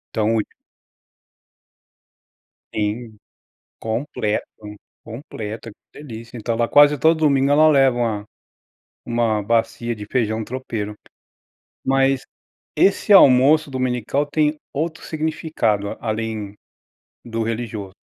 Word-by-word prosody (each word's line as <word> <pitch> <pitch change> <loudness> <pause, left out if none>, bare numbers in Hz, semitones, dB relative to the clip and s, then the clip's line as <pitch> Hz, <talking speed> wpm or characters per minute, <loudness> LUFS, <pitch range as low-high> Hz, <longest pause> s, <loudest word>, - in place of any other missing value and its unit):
Então 110 +1 +1 2.4
Sim 110 +1 -3 0.6
completo, 110 -2 -2 0.6
completa, 115 -3 -7
que 145 - -16
delícia, 115 -1 -9
então 115 +1 -2
ela 115 0 0
quase 145 0 +6
todo 160 +2 +3
domingo 140 -2 +3
ela 155 +2 +6
leva 135 -4 +4
uma 110 -4 -1 0.8
uma 115 -3 0
bacia 115 +1 0
de 105 -1 -8
feijão 110 -2 -1
tropeiro, 115 -5 -5 0.9
mas, 135 0 +2 0.5
esse 200 +1 +3
almoço 145 -2 +6
dominical 130 +2 -1
tem 150 +1 +1 0.2
outro 160 +3 -3
significado 155 -10 -2
além 110 -2 -4 0.7
do 115 -1 -3
religioso. 110 -4 -4
120 Hz, 95 wpm, -21 LUFS, 110-140 Hz, 2.4 s, quase